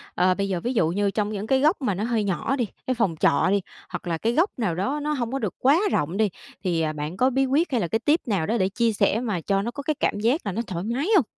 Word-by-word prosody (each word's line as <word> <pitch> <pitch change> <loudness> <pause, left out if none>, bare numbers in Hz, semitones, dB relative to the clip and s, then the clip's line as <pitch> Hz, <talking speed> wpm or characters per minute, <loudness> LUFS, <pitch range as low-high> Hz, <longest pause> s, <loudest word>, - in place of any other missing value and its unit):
ờ, 185 +1 +3
bây 195 +1 -2
giờ 180 -2 -1
ví 245 +7 -2
dụ 165 -8 +2
như 200 +3 0
trong 210 0 -1
những 210 0 -4
cái 265 +2 +3
góc 310 +3 +2
mà 210 -6 +1
nó 205 - -2
hơi 230 -2 0
nhỏ 200 +7 -1
đi, 240 -5 -1 0.2
cái 255 - +2
phòng 225 -9 0
trọ 140 - +3
đi, 200 0 +2 0.3
hoặc - - -6
là 165 -1 0
cái 230 +7 0
góc 335 - +3
nào 180 -7 0
đó 265 - -1
nó 300 +1 -1
hông 240 -4 -2
có 270 - -1
được - - -3
quá 280 +6 +4
rộng 165 +7 0
đi 220 -2 +3 0.3
thì, 170 -3 0
à, 155 -1 0
bạn 150 +4 -5
có 255 - +4
bí 270 +1 +1
quyết 290 +4 +1
hay 240 -4 +1
là 170 - 0
cái 225 - 0
tip 300 +7 +2
nào 190 -7 0
đó 225 +3 0
để 190 -3 +1
chia 230 +2 +1
sẻ 210 +1 +2
mà 210 -9 -2
cho 195 +2 +1
nó 235 +4 -3
có 280 +3 -7
cái 305 +2 0
cảm 205 - 0
giác 240 +9 +2
là 200 - -1
nó 215 +5 -2
thoải 175 -2 -4
mái 245 - -1
hông? 330 - +5
220 Hz, 310 wpm, -24 LUFS, 190-260 Hz, 0.3 s, hông